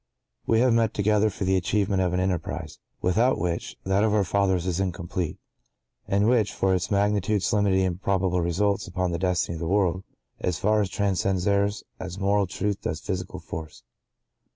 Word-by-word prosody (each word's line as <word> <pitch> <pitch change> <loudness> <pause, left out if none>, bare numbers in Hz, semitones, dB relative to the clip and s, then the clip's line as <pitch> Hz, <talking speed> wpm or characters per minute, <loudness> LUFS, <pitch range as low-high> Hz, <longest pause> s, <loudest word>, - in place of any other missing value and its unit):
(¶ - - -54 0.4
2) - - +2
We 110 - +4
have 125 -2 +4
met 115 -2 +2
together 105 +1 +3
for 100 - -5
the 95 0 +2
achievement 95 +1 +1
of 90 -1 +1
an 90 - 0
enterprise, 85 -4 -3 0.2
without 115 +9 +3
which, 85 -1 -3
that 95 +2 +2
of 110 -1 +2
our 105 - +3
fathers 95 -1 +1
is 90 -1 -1
incomplete, 85 -2 -3 0.7
and 100 +1 +2
which, 115 -4 +3
for 95 -1 +1
its 90 -1 -1
magnitude, 100 0 +1
solemnity, 100 -2 +2
and 90 0 -2
probable 95 -2 +1
results 100 +4 0
upon 90 0 -1
the 85 - -2
destiny 90 -2 0
of - - -8
the 85 - -3
world, 95 -1 +1 0.4
as 90 -3 -1
far 105 +4 +2
transcends 95 -1 0
theirs, 100 +1 +1 0.2
as 90 - -6
moral 100 0 +2
truth 100 +3 -2
does 80 - -3
physical 95 -1 -4
force. 80 -2 -8
95 Hz, 185 wpm, -25 LUFS, 90-100 Hz, 0.7 s, We